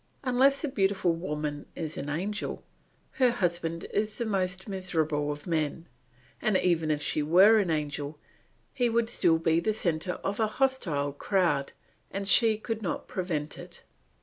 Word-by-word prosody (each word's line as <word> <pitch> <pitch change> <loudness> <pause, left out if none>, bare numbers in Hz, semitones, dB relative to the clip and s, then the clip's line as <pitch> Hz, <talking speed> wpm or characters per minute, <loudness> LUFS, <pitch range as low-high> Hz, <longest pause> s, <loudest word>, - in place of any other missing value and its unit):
Unless 270 +3 +3
a - - +1
beautiful 195 -7 +1
woman 150 -3 -4
is 160 -2 -4
an 140 - -5
angel, 190 +8 -3 0.5
her 255 -2 +3
husband 175 -7 -1
is 210 +1 -1
the 235 - -2
most 190 -2 -1
miserable 160 -7 -1
of 145 0 -7
men; 165 0 -2 0.5
and 215 -4 +2
even 165 -4 +1
if 150 -1 0
she 155 - 0
were 190 +9 +6
an 195 -4 0
angel 150 -1 -2 0.6
he 245 -2 +1
would 230 0 +1
still 165 -7 +4
be 165 0 +2
the 210 +5 0
centre 175 -3 0
of 200 +2 -2
a 220 - +3
hostile 170 - 0
crowd 150 -4 0 0.4
and 195 0 -4
she 220 +1 +5
could 225 0 -4
not 190 - -3
prevent 155 -5 -3
it. - - -12
180 Hz, 160 wpm, -28 LUFS, 155-215 Hz, 0.6 s, were